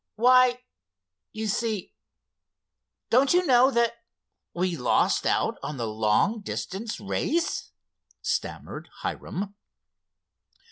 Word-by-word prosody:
"Why—you 220 - 0
see—don't 230 - -3
you 360 0 +3
know 255 -2 +6
that 235 -2 +1 0.5
we 180 0 -1
lost 125 -5 +2
out - - +1
on 140 +1 -5
the 120 - -2
long 110 - +1
distance 205 +2 -5
race?" 325 +11 -1 0.5
stammered - - -4
Hiram. 200 +2 -4
215 Hz, 85 wpm, -26 LUFS, -, 0.5 s, know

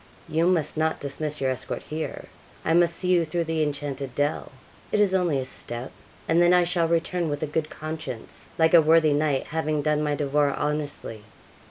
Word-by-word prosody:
'You 165 +1 +1
must 160 -5 +1
not 160 0 0
dismiss 150 +2 -3
your 135 -1 +1
escort 130 0 -4
here. 155 +1 -5 0.4
I 160 - +2
must 170 0 +4
see 180 - -1
you 175 -2 +4
through 170 +2 -1
the 160 -1 -1
enchanted 140 -3 -3
dell 145 +1 -1 0.4
it 210 - +1
is 200 -2 +3
only 175 -6 +2
a 130 - -2
step 120 -1 -5 0.4
and 165 +1 +3
then 175 +1 +5
I 180 - +5
shall 170 -1 +1
return 170 0 0
with 145 +1 -3
a - - +2
good 155 +1 -2
conscience, 155 -6 -7
like 160 0 +3
a 170 - +9
worthy 160 -1 +4
knight, 145 -2 +1
having 155 -2 -1
done 150 0 +1
my 150 -1 0
devoir 145 -1 +1
honestly.' 145 -7 -3
155 Hz, 195 wpm, -25 LUFS, 145-165 Hz, 0.4 s, a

